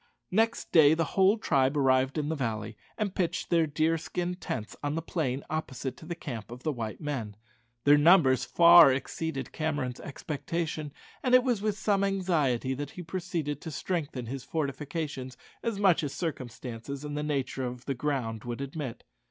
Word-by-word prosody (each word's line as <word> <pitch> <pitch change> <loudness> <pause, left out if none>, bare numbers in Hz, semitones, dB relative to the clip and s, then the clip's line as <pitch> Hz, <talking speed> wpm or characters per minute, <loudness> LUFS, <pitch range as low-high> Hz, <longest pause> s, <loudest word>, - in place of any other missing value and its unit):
Next 225 +4 +1
day 155 -2 +7
the 165 - +1
whole 195 +3 +5
tribe 140 -8 +2
arrived 130 0 +3
in 150 -1 -1
the 160 - 0
valley, 110 -5 -3 0.2
and 210 -4 -1
pitched 175 -2 -2
their 165 -2 +4
deerskin 165 +3 0
tents 125 - -5
on 145 +1 -1
the 165 - -1
plain 140 -6 -2
opposite 135 -4 -4
to 160 - -12
the 170 - -3
camp 120 -11 -6
of 120 +2 -10
the 155 - +1
white 115 -5 -5
men. 130 -9 -4 0.5
Their 145 +1 +6
numbers 145 -5 +6
far 170 -4 +8
exceeded 135 +1 -3
Cameron's 145 -6 -2
expectation, 155 +1 -4 0.3
and 255 -1 +4
it 255 - +6
was 245 -6 0
with 210 -1 -1
some 200 -1 +1
anxiety 160 -10 +1
that 145 +2 -4
he 180 - -8
proceeded 165 -4 -3
to - - -6
strengthen 145 -5 -3
his 130 +3 -5
fortifications 145 -3 -4 0.2
as 230 -3 -2
much 185 -4 +4
as 145 - -3
circumstances 130 -3 -5
and 145 0 -4
the 150 - -1
nature 135 -3 -2
of 125 0 -5
the 135 - -1
ground 125 -5 -2
would 120 0 -5
admit. 140 -3 -5
150 Hz, 175 wpm, -29 LUFS, 130-170 Hz, 0.5 s, far